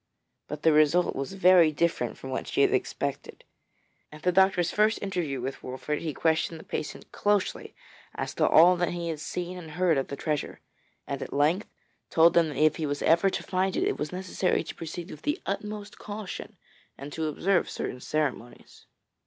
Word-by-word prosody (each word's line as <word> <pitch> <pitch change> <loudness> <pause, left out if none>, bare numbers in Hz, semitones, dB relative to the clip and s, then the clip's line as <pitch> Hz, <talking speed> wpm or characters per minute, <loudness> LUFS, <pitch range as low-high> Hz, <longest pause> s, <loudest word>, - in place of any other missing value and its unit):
But 150 0 -6
the 160 - +5
result 155 +4 +3
was 135 +7 -4
very 180 -4 +6
different 150 -6 -1
from 130 - -8
what 130 - -3
she - - 0
had - - +4
expected. - - -3 0.7
At 150 0 -12
the 180 - +3
doctor's 190 -1 +3
first 215 +1 +3
interview 175 -9 -2
with 135 +2 -5
Wolfert 130 +4 -4
he 160 - -2
questioned 160 +1 0
the - - -11
patient - - -6
closely 205 -2 -1 0.4
as - - -4
to - - +2
all 175 +3 +7
that 175 0 0
he 170 -1 -3
had 160 -2 -4
seen 180 +3 -5
and 165 -3 -10
heard 170 -2 +2
of 135 - -3
the 140 - -5
treasure, 150 0 -3 0.5
and - - -4
at - - -6
length 155 +8 +1 0.4
told 165 +1 +5
him 170 -1 +5
that 145 - -6
if 155 0 +3
he 155 - -2
was 145 0 -3
ever 170 +4 +4
to - - -4
find 185 0 0
it, - - +1
it - - -1
was 150 - -3
necessary 185 0 -1
to - - -7
proceed 170 +2 -7
with - - -10
the 295 +4 -1
utmost 210 +1 -5
caution 205 -2 -7 0.4
and 140 +2 -8
to 160 -1 -2
observe 180 +5 +1
certain 125 - -4
ceremonies. 145 -6 -4
165 Hz, 195 wpm, -27 LUFS, 150-185 Hz, 0.7 s, all